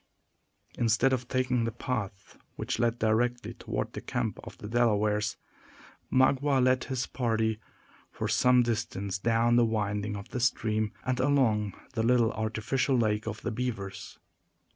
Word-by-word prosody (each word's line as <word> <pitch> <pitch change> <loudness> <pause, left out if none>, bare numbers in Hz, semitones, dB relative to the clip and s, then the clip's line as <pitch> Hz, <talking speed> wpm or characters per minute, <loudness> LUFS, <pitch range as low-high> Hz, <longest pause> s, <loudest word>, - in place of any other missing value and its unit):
Instead 120 +3 +3
of 125 -1 -2
taking 125 -2 +1
the 115 - -1
path 110 -5 -5 0.2
which - - -3
led 120 0 +1
directly 120 +3 0
toward - - -4
the - - -6
camp - - -3
of - - -10
the 105 - -8
Delawares, 105 -2 +1 0.7
Magua 135 +1 +3
led 130 0 +3
his 130 -2 -2
party 110 -3 -1 0.5
for 110 - -3
some 125 +4 +4
distance 105 -4 -2
down 115 +2 +3
the 120 - +5
windings 105 -2 -1
of 100 - -9
the 125 - -4
stream, 110 -3 0
and 130 -1 0
along 115 -8 +2 0.2
the 115 - 0
little 115 -1 +3
artificial 110 +5 0
lake 110 -2 0
of 110 -1 -4
the 115 - -2
beavers. 110 -5 -5
115 Hz, 145 wpm, -29 LUFS, 110-125 Hz, 0.7 s, the